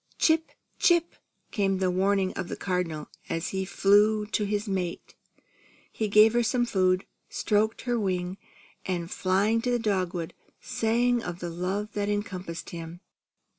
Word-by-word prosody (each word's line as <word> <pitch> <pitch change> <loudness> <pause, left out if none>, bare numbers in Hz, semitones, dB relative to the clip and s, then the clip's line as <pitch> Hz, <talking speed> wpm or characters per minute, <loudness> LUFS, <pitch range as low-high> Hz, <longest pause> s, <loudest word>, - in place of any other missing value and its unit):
"Chip! 320 0 +3 0.3
Chip!" 345 -1 +3 0.4
came 195 -2 +1
the 185 -1 +1
warning 190 +1 +1
of 185 - -4
the - - -4
Cardinal, 175 -5 -2 0.2
as 165 0 -2
he 190 0 -2
flew 210 +3 +4
to 210 0 -1
his 205 +1 -2
mate. 185 -3 -3 0.8
He 220 - -2
gave 215 +2 +6
her 240 - +3
some 240 +1 +1
food, 185 -4 +2 0.2
stroked 215 +1 0
her 245 -2 0
wing, 185 -2 -2 0.4
and 175 -2 -3
flying 200 +5 +2
to 250 - -1
the 245 - +2
dogwood, 185 -6 -1 0.3
sang 245 0 +1
of 175 -5 -5
the 175 -1 -5
love 190 +5 -3
that 205 -1 -1
encompassed 185 -5 -4
him. 170 0 -7
200 Hz, 150 wpm, -27 LUFS, 180-220 Hz, 0.8 s, gave